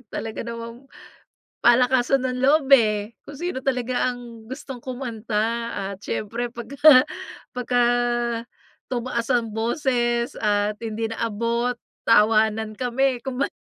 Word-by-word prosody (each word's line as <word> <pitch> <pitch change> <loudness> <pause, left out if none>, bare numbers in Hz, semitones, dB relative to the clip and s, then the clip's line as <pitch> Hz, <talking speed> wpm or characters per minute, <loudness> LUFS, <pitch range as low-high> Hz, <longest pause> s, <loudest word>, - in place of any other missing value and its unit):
talaga 225 -1 -5
namang 235 +3 -8 0.8
palakasan 250 +2 +4
ng 250 - -3
loob, 280 0 +4
eh. 215 -2 -1
Kung 285 - -10
sino 350 -7 -3
talaga 255 -1 0
ang 235 -2 -11
gustong 260 -2 -8
kumanta 235 -2 -2 0.2
at 195 - -7
siyempre 235 +3 -3
pagka 235 +3 -8 0.8
pagka 245 0 +1 1.1
tumaas 240 -1 -2
ang 235 -2 +1
boses 240 0 0
at 210 -1 0
hindi 225 0 -2
naabot, 230 +2 -1 0.3
tawanan 220 0 +3
kami 255 +2 +1
kumbaga 265 +1 -2
235 Hz, 110 wpm, -23 LUFS, 225-255 Hz, 1.1 s, palakasan